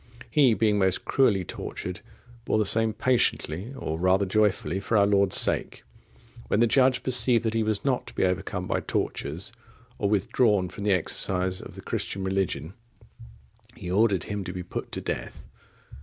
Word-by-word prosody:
He, 130 -5 +4
being 105 -2 +2
most 95 -1 +1
cruelly 105 -9 +2
tortured, 90 +1 -6 0.4
bore 110 - 0
the 110 - +1
same 115 +2 +2
patiently, 110 - 0
or 80 -7 -4
rather 95 +2 +2
joyfully, 95 -3 0
for 110 +3 0
our 100 - +5
Lord's 100 -2 +3
sake. - - +1 0.6
When 105 - +1
the 120 - +5
judge 130 +2 +3
perceived 120 -2 +3
that 110 - 0
he 115 - +1
was 110 +1 -2
not 130 -3 0
to - - -11
be - - 0
overcome 90 0 -2
by - - -1
tortures, 85 +9 -3 0.5
or 100 - 0
withdrawn 105 -1 +1
from 100 - -7
the 105 - +2
exercise 90 +1 +2
of - - -11
the - - -9
Christian 95 - -3
religion, 95 -4 -2 1.0
he 90 - -7
ordered 100 -3 +2
him 105 -1 -4
to 90 - -5
be 90 0 -6
put 90 - -6
to - - -4
death. - - -5
100 Hz, 170 wpm, -26 LUFS, 95-110 Hz, 1.0 s, our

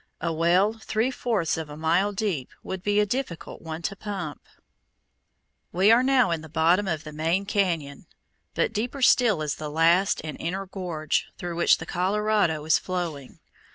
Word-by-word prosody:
A 170 0 -2
well 175 +6 +3
three 225 +2 -1
fourths 210 -12 -1
of 160 -2 -5
a 150 - -9
mile 170 +6 +2
deep 190 -10 -2
would 190 -1 -5
be 205 +2 +1
a 210 - +4
difficult 210 -6 -4
one 160 0 -6
to 195 - -2
pump. 190 -7 -6 1.3
We 190 +5 +4
are 235 +2 +6
now 260 -6 +3
in 165 -2 -1
the 160 - -11
bottom 170 +6 +2
of 160 -4 -2
the 155 - -9
main 165 +6 0
cañon, 170 -8 -1 0.5
but - - 0
deeper 245 +5 -3
still 220 -11 +4
is 150 -1 -2
the 155 -1 -5
last 165 +5 +3
and 155 -1 -6
inner 190 +4 -3
gorge, 175 -5 -2
through 175 -1 -5
which 170 - +4
the - - -7
Colorado 190 -4 0
is 155 - +4
flowing. 170 -7 -5
180 Hz, 175 wpm, -25 LUFS, 160-205 Hz, 1.3 s, are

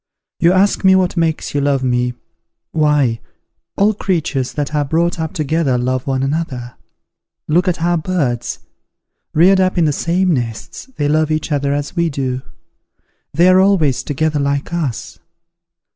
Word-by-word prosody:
You 170 - +4
ask 195 +3 +2
me 190 0 +6
what 185 -1 +1
makes 165 -2 -1
you 145 - 0
love 140 -2 +1
me. 125 -1 0 0.6
Why, 150 -7 +2 0.6
all 210 +2 +3
creatures 160 -10 -1
that 145 0 -3
are 150 -1 +1
brought 165 +4 0
up 160 -1 -2
together 155 -4 0
love 130 +1 -2
one 135 -1 0
another. 135 -4 -3 0.7
Look 175 +5 +2
at 170 -2 -1
our 175 -1 +2
birds; 150 -9 -2 0.8
reared 185 +5 +5
up 185 0 +1
in 170 - +3
the 150 - +1
same 180 +4 +1
nests, 120 - -5
they 145 - -1
love 155 +1 +1
each 155 +1 -2
other 140 -1 0
as 145 +3 -3
we 170 -1 +1
do; 130 -3 -3 0.9
they 170 +5 +3
are 185 0 +6
always 175 -10 +2
together 150 +1 -1
like 140 +3 -2
us. 150 -9 -4
155 Hz, 160 wpm, -17 LUFS, 135-175 Hz, 0.9 s, me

